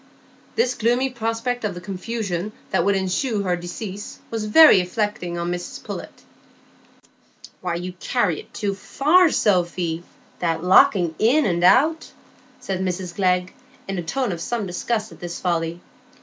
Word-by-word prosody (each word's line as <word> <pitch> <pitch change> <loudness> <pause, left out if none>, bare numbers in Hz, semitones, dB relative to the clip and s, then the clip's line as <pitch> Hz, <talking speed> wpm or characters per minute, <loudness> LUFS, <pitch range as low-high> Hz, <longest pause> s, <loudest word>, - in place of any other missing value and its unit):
This 250 - +2
gloomy 245 +3 +1
prospect 235 +1 -2
of 205 -4 -2
the - - -6
confusion 195 0 -4 0.2
that - - +2
would 200 +2 +2
ensue 195 +6 -1
on 200 - 0
her 180 -2 +1
decease 185 +3 -7
was 225 -2 -2
very 295 +2 +8
affecting 180 -1 -2
to 170 - -3
Mrs 175 +1 -4
Pullet. - - -8 1.4
"You 180 0 -3
carry 205 - 0
it - - -13
too 200 -1 -2
far, 310 - +3
Sophy,—that 175 - -1
locking 180 -2 +5
in 265 +8 +4
and 175 -3 0
out," 310 - +4 0.5
said 190 -1 -3
Mrs 185 -1 -3
Glegg, 180 -1 +1 0.3
in 195 -2 -3
a - - -1
tone 245 +8 -2
of 170 -2 -5
some 230 +2 -2
disgust 215 +4 -2
at - - -14
this 175 -1 -6
folly. 170 -1 -1
190 Hz, 150 wpm, -22 LUFS, 175-230 Hz, 1.4 s, very